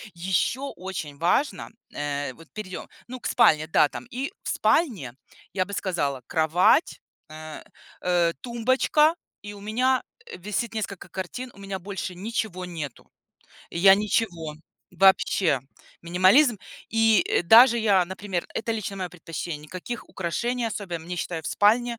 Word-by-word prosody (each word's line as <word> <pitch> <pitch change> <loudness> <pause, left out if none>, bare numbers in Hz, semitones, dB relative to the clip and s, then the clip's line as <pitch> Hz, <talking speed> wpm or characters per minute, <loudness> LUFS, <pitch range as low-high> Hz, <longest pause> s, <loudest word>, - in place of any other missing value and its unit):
Еще 190 +9 0
очень 180 -6 -6
важно- 180 - +1 0.2
э, 145 -2 -3
вот 165 +5 -17
перейдем, 195 -4 -7 0.2
ну, 255 +1 -7
к - - -4
спальне, 155 -9 +4
да, 150 - +4
там. 245 - -8
И 265 +7 -4
в - - -5
спальне, 205 - +1 0.4
я 185 - +1
бы 200 - -9
сказала, 145 -10 -2
кровать, 160 - +3 0.3
э 155 0 -9 0.4
э, 175 -2 +2
тумбочка, 260 +6 +2 0.3
и 205 - -7
у 205 - -11
меня, 250 +6 +1 0.2
э, - - -9
висит 210 +5 -3
несколько 205 -3 -5
картин, 245 +7 -6
у - - -17
меня 195 -1 -5
больше 190 -1 -6
ничего 190 -2 -3
нету. 160 -7 -7 0.6
И - - -5
я 195 +2 +8
ничего. 190 -7 -1 0.4
Вообще. 185 -5 +3 0.4
Минимализм. 190 - +4 0.3
И, 225 -3 +4
э, - - +2
даже 235 +7 +8
я, 200 -5 +3
например, 190 -1 -4
это 225 - -2
лично 215 -3 -4
мое 185 -2 -3
предпочтение, 165 -2 -6
никаких 185 +9 -7
украшений 235 +8 -2
особенно. 175 -7 -5
Мне, 180 +1 -5
считаю, 165 -2 -3
в - - -7
спальне 235 +3 +2
190 Hz, 145 wpm, -25 LUFS, 170-225 Hz, 0.6 s, я